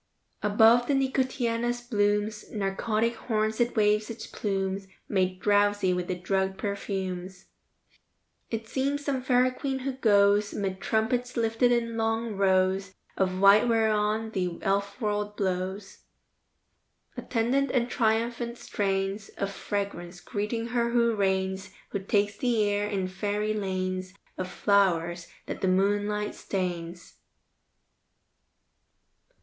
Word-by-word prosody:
Above 225 +3 +5
the 285 - +2
nicotiana's 245 -3 0
blooms' 210 -2 0
Narcotic 215 +3 0
horns 220 -2 -1
it 240 0 +1
waves 210 0 +2
its 230 -1 -6
plumes, 195 -1 -2 0.2
Made 185 -2 0
drowsy 205 -2 +3
with 180 0 -2
the 185 - -1
drugged 190 +1 -1
perfumes. 190 -2 -4 1.0
It 225 -1 -4
seems 280 +4 -1
some 270 -3 0
Fairy 255 0 +3
Queen 270 +1 -3
who 265 +1 -3
goes 205 -4 +3
'Mid 195 -1 -3
trumpets 245 +3 0
lifted 225 +1 +2
in 230 -1 0
long 225 0 -1
rows 190 0 +2 0.2
Of 185 -1 0
white 200 +4 +6
whereon 220 -1 +1
the 180 -4 -2
Elfworld 205 +1 -1
blows. 190 +1 -3 1.2
Attendant 255 +4 0
and 245 -2 +1
triumphant 235 +1 0
strains 195 0 -2
Of 200 0 -2
fragrance, 195 -3 -4
greeting 220 +5 -3
her 235 0 +1
who 235 -1 +3
reigns, 190 -1 0 0.2
Who 200 - -2
takes 205 +1 0
the 240 -5 +1
air 205 0 0
in 195 -3 -1
fairy 205 +3 -1
lanes 185 -2 -3 0.2
Of 185 0 -4
flowers, 175 -4 +1 0.2
that - - -6
the 190 - +1
moonlight 205 +2 +1
stains. 175 -2 -4
205 Hz, 120 wpm, -27 LUFS, 195-230 Hz, 1.2 s, white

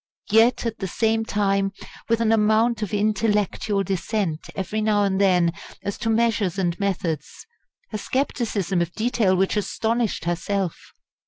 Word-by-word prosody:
Yet, 225 +3 +4
at 225 -1 -3
the 190 - -2
same 225 +3 0
time, 195 -2 +1 0.4
with 230 0 +2
an 225 -1 +3
amount 220 +1 +3
of 210 - -3
intellectual 210 -1 +1
dissent 195 -3 -2
every 205 +3 -2
now 210 -1 +2
and 195 -1 +1
then 180 -3 +3 0.3
as 200 - -4
to 225 - -1
measures 220 -5 +1
and 175 -3 +1
methods, 185 - -3 0.5
a 215 - -2
scepticism 210 -8 -1
of 170 0 -1
detail 220 -4 +1
which 190 +3 +1
astonished 220 -1 -1
herself! 175 +1 -2
205 Hz, 145 wpm, -23 LUFS, 190-225 Hz, 0.5 s, Yet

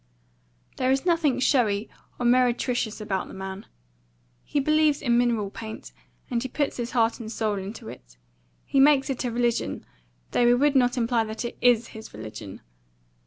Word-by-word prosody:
There 255 - +1
is 270 +3 +1
nothing 325 -7 +2
showy 225 -6 +2 0.3
or 245 - -1
meretricious 245 -2 +2
about 195 -3 -2
the - - -11
man. 190 +1 -7 0.8
He 290 - -1
believes 305 0 +3
in 240 -4 +1
mineral 235 -4 +1
paint, 220 0 -8 0.4
and 235 -1 0
he 260 - -4
puts 290 +2 -1
his 240 -1 -3
heart 230 +1 +2
and 220 -2 -7
soul 215 -3 -1
into 210 +4 -8
it. - - -12 0.5
He 275 - +1
makes 275 0 +5
it 260 -1 -3
a 245 - -1
religion; 240 0 -1 0.5
though 240 - +3
we 240 - +6
would 285 +3 +2
not 250 -1 +3
imply 235 -1 +2
that 220 +2 -5
it 235 - -5
IS 240 -2 +4
his 220 - -11
religion. 105 -2 -8
240 Hz, 170 wpm, -25 LUFS, 220-260 Hz, 0.8 s, we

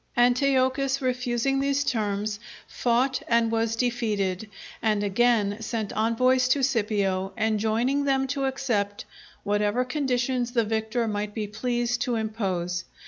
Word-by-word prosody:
Antiochus 265 +2 +2
refusing 255 +1 0
these 280 +1 +1
terms, 210 -3 -1 0.3
fought 255 +2 +1
and 230 -1 +2
was 225 0 0
defeated, 220 -5 -1 0.3
and 215 -2 +1
again 205 0 +2
sent 220 -2 -3
envoys 250 +4 +2
to 270 +1 +2
Scipio, 205 -6 0
enjoining 220 +6 +1
them 270 -1 +2
to 275 0 -2
accept 225 -7 -1 0.4
whatever 205 +4 +1
conditions 250 -3 -1
the 235 -2 +3
victor 220 +2 -1
might 210 -1 -3
be 215 -2 -2
pleased 240 +3 -1
to 245 -1 0
impose. 190 -5 -2
235 Hz, 125 wpm, -26 LUFS, 210-255 Hz, 0.4 s, the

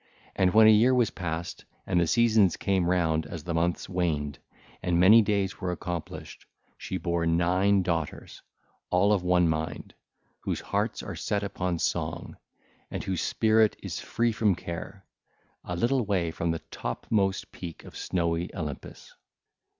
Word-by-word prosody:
And 95 -1 +3
when 110 +2 +7
a 110 - +9
year 120 +5 +5
was 120 -3 +2
passed 85 -1 -5 0.2
and 90 - +1
the 85 - +1
seasons 110 -3 +4
came 95 -3 +1
round 80 -3 +1
as 80 0 -7
the 85 0 -3
months 85 +1 0
waned, 80 -6 -2 0.4
and 90 -2 +1
many 105 +6 +8
days 100 -2 -1
were 90 -2 -1
accomplished, 85 -2 -6 0.3
she 95 - -5
bare 85 -2 -1
nine 90 +4 +3
daughters, 85 -3 -3 0.5
all 100 +3 +3
of 100 - +1
one 90 -1 +3
mind, 80 0 -3 0.5
whose - - -3
hearts - - -2
are - - -6
set 100 -1 -2
upon 90 -3 -2
song - - -2 0.5
and - - -4
their 95 -1 -2
spirit 110 +4 +2 0.2
free 115 +1 0
from 105 -3 +2
care, 85 +3 -7 0.6
a 90 - -4
little 120 +8 +1
way 95 -5 0
from 85 +1 -2
the 80 -1 -2
topmost 95 - -1
peak 85 -4 -8
of - - -12
snowy 85 -1 -1
Olympus. 75 -5 -7
90 Hz, 150 wpm, -27 LUFS, 85-100 Hz, 0.6 s, a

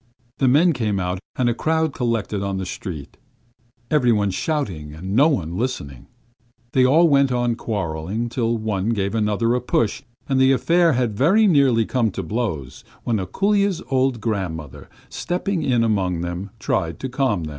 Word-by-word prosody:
The 135 - +3
men 160 +7 +4
came 110 -6 -1
out, 90 0 -2 0.2
and 125 - +1
a 120 - +2
crowd 160 +3 0
collected 115 -5 -1
in 100 -1 -2
the 95 - -3
street, 80 -5 -7 0.7
every 135 -6 +3
one 105 -3 +1
shouting 90 - -3
and 95 +5 -5
no 140 +6 +6
one 85 - -1
listening. 70 - -4 0.6
They 130 - +3
all 155 +7 +5
went 140 -3 +3
on 120 -1 +1
quarrelling, 100 0 -3
till 115 -1 0
one 105 -2 -2
gave 100 -2 -1
another 110 +1 +1
a 125 - 0
push, 115 -3 0 0.3
and 135 -1 +1
the 130 0 +5
affair 165 +5 +3
had 125 -3 0
very 190 - +4
nearly 135 - +4
come 120 -2 +1
to 95 - -4
blows, 80 - -4 0.2
when 115 -2 0
Ako√∫lya's 200 - 0
old 130 -2 +1
grandmother, 90 - -4 0.2
stepping 180 0 -2
in 125 -5 +2
among 95 -6 0
them, 90 +3 -4
tried 80 -1 -2
to 130 - -2
calm 130 - 0
them. 75 - -5
115 Hz, 170 wpm, -22 LUFS, 95-135 Hz, 0.7 s, no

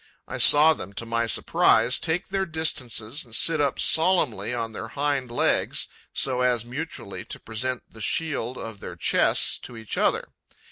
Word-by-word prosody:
I - - -5
saw 155 +2 +7
them, 100 - -8
to 115 - -5
my 115 0 -1
surprise, 115 +2 +3
take 170 +3 -2
their 195 0 -1
distances 145 -5 -1
and 115 -3 -7
sit 160 +3 +3
up 140 -2 0
solemnly 160 - +2
on 115 -2 -3
their 110 - -7
hind 140 0 -2
legs, 120 - 0 0.3
so 125 -1 0
as 125 -2 +1
mutually 130 -5 -6
to - - -5
present 120 +3 -4
the 110 - -14
shield 130 -3 -2
of 115 -3 -7
their - - -8
chests - - +2
to 120 - -10
each 110 -2 -5
other. - - 0
125 Hz, 170 wpm, -25 LUFS, 115-150 Hz, 0.3 s, saw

